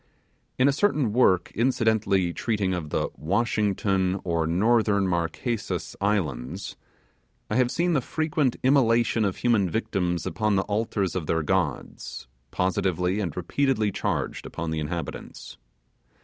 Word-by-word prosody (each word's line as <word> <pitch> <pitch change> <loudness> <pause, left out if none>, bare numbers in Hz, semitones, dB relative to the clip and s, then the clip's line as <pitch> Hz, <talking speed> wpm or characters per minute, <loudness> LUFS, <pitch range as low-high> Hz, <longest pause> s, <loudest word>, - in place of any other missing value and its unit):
In 130 - +4
a - - +5
certain 145 - +1
work 95 -7 +3
incidentally 110 -7 +1
treating 105 -4 -1
of 85 -4 -4
the - - -1
'Washington, 100 0 0
or 85 -3 0
Northern 100 +2 +2
Marquesas 90 +4 -2
Islands,' 80 -12 -2 0.8
I - - +1
have 125 -1 +3
seen 175 +5 +1
the 140 - +2
frequent 150 -1 0
immolation 120 -4 +3
of 100 -3 0
human 110 -6 +2
victims 90 -4 -1
upon 105 -1 0
the 95 - +2
altars 105 -3 -1
of 85 -5 -3
their 80 -1 +1
gods, - - -2 0.2
positively 90 - 0
and 90 -6 -3
repeatedly 110 +3 +1
charged - - -2
upon 85 -1 -4
the 80 - -1
inhabitants. 75 -3 -6
100 Hz, 130 wpm, -26 LUFS, 90-115 Hz, 0.8 s, a